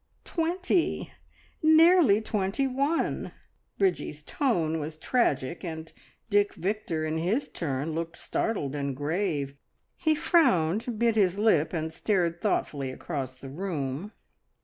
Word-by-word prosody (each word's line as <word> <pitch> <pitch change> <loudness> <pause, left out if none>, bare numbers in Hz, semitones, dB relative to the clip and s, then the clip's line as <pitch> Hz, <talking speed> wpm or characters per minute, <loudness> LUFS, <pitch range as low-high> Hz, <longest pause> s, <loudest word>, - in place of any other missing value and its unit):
"Twenty 350 +1 0 0.5
nearly 315 - +6
twenty 210 +5 0
one!" 275 +5 -1 0.4
Bridgie's 175 -6 0
tone 165 - 0
was 155 +1 -5
tragic, 160 - 0
and 160 -2 -6 0.3
Dick 205 -1 +2
Victor 180 -5 -2
in 155 +1 -1
his 205 - 0
turn 145 -1 -3
looked 165 +1 -4
startled 150 -11 -2
and 140 -2 -2
grave. 145 -1 -1 0.4
He 315 -2 +2
frowned, 230 - +2
bit 230 0 +2
his 195 -3 +3
lip, 205 -8 +3
and 160 -2 -3
stared 170 -3 0
thoughtfully 145 -9 -1
across 130 -2 -5
the 135 - -8
room. 155 +1 -4
180 Hz, 120 wpm, -28 LUFS, 155-225 Hz, 0.5 s, nearly